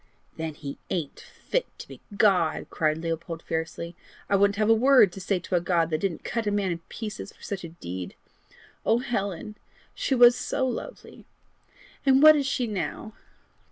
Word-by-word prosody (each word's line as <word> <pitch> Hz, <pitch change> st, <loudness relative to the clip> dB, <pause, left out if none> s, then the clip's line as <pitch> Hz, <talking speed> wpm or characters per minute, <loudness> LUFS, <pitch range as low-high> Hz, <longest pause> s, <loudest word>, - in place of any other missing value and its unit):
"Then 160 Hz, -2 st, -5 dB
he 140 Hz, -2 st, -8 dB
ain't 160 Hz, -6 st, -3 dB
fit -, -, -3 dB
to -, -, -10 dB
be -, -, -12 dB, 0.2 s
God!" 180 Hz, -7 st, +3 dB
cried 155 Hz, -1 st, +1 dB
Leopold 165 Hz, 0 st, -4 dB
fiercely. 165 Hz, +1 st, -4 dB, 0.4 s
"I -, -, +5 dB
wouldn't 200 Hz, +1 st, +3 dB
have 215 Hz, 0 st, +1 dB
a 225 Hz, -, +7 dB
word 250 Hz, -3 st, +5 dB
to 195 Hz, -, -9 dB
say 195 Hz, +1 st, 0 dB
to 180 Hz, +1 st, -3 dB
a 175 Hz, -, +2 dB
God 170 Hz, -2 st, +1 dB
that 155 Hz, -, 0 dB
didn't 175 Hz, -3 st, -3 dB
cut 230 Hz, -1 st, -2 dB
a -, -, +2 dB
man 200 Hz, -3 st, 0 dB
in 170 Hz, -, -3 dB
pieces 215 Hz, -2 st, -6 dB
for -, -, -21 dB
such 195 Hz, -3 st, -5 dB
a 170 Hz, -, -6 dB
deed! 90 Hz, -, -7 dB, 0.7 s
Oh 225 Hz, -, +3 dB
Helen, 210 Hz, -4 st, -3 dB, 0.4 s
she 270 Hz, -, 0 dB
was 240 Hz, -1 st, +8 dB
so 260 Hz, +1 st, -1 dB
lovely! 255 Hz, -, -7 dB, 0.8 s
and 270 Hz, +1 st, +5 dB
what 310 Hz, 0 st, +10 dB
is 280 Hz, -2 st, 0 dB
she 250 Hz, -1 st, 0 dB
now?" 215 Hz, +1 st, -4 dB
195 Hz, 185 wpm, -26 LUFS, 165-230 Hz, 0.8 s, what